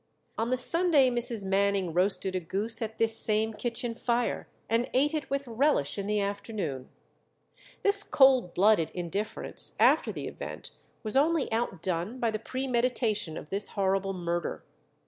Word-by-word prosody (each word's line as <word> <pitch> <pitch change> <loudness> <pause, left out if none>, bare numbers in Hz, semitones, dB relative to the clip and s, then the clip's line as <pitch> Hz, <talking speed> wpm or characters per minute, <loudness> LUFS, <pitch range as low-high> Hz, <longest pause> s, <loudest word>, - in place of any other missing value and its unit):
On 225 +1 -2
the 255 - +1
Sunday 315 -3 +4
Mrs. 235 -4 0
Manning 195 -2 +1
roasted 185 +1 +1
a - - +1
goose 200 +8 -3
at 220 -1 -4
this 225 -1 +3
same 220 0 +2
kitchen 235 +1 -3
fire, 240 0 -1 0.2
and 230 +3 0
ate 290 +4 +3
it 305 -2 -3
with 275 -1 -2
relish 235 - +1
in 200 -1 -4
the 210 0 +1
afternoon. 200 - -4 0.9
This 405 0 +4
cold 265 - +4
blooded 195 -4 +4
indifference 180 +4 -1
after - - +4
the - - -6
event - - -7 0.3
was 215 +1 -3
only 300 +1 +2
outdone 190 -2 -2
by 230 -2 +1
the 215 - -3
premeditation 235 -7 -1
of 150 - -10
this 200 +1 -2
horrible 195 0 0
murder. 175 -2 -3
220 Hz, 150 wpm, -28 LUFS, 195-250 Hz, 0.9 s, Sunday